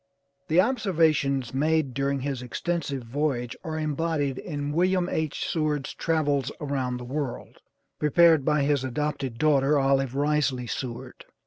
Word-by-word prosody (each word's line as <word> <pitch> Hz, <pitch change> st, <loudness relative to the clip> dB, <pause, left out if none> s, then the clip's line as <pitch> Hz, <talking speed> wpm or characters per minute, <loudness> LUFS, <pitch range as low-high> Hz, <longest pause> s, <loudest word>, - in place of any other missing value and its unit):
The 160 Hz, +3 st, +3 dB
observations 160 Hz, -, +2 dB
made 150 Hz, 0 st, +1 dB
during 140 Hz, 0 st, -1 dB
this 135 Hz, -2 st, -3 dB
extensive 140 Hz, +1 st, -3 dB
voyage 125 Hz, -1 st, -2 dB
are 160 Hz, -1 st, -4 dB
embodied 155 Hz, -3 st, -1 dB
in 145 Hz, -4 st, -4 dB
"Wm. 180 Hz, +3 st, +2 dB
H. 160 Hz, -4 st, -2 dB
Seward's 150 Hz, -3 st, -1 dB
Travels 145 Hz, -5 st, 0 dB
around 135 Hz, -4 st, -2 dB
the 125 Hz, -, -7 dB
World," 135 Hz, 0 st, -5 dB, 0.4 s
prepared 160 Hz, 0 st, +5 dB
by 150 Hz, 0 st, +2 dB
his 140 Hz, -2 st, +1 dB
adopted 135 Hz, -1 st, -3 dB
daughter, 145 Hz, 0 st, +3 dB
Olive 135 Hz, -1 st, +1 dB
Risley 145 Hz, -3 st, +1 dB
Seward. 120 Hz, 0 st, -6 dB
145 Hz, 130 wpm, -26 LUFS, 135-155 Hz, 0.4 s, prepared